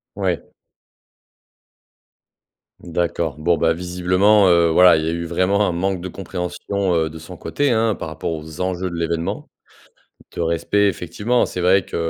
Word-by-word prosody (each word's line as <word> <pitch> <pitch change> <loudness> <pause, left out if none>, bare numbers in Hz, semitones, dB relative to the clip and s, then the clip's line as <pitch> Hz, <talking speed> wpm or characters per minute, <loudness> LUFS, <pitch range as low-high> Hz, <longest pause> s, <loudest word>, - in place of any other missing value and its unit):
Ouais. - - -2 2.3
D'accord. 85 -2 -2
Bon, 85 +2 +1
bah, 80 +2 +2
visiblement, 90 +4 +2
heu, 85 -2 +4
voilà, 90 +2 +6
il 80 - 0
y - - 0
a - - 0
eu 85 0 -3
vraiment 95 +4 +1
un - - -1
manque 95 +1 -1
de 90 - -6
compréhension, 95 +1 -3
heu, 80 -1 +1
de 80 +1 -10
son 80 +3 -10
côté, 145 +10 -1
hein, 110 -1 +2
par - - -6
rapport - - -4
aux 80 0 -7
enjeux 90 0 -2
de 85 - -7
l'événement. 85 0 -3 0.9
De - - -2
respect 85 +5 +1
effectivement. 105 +7 0
C'est 90 - -5
vrai 90 +1 +3
que, - - -8
90 Hz, 165 wpm, -20 LUFS, 85-95 Hz, 2.3 s, voilà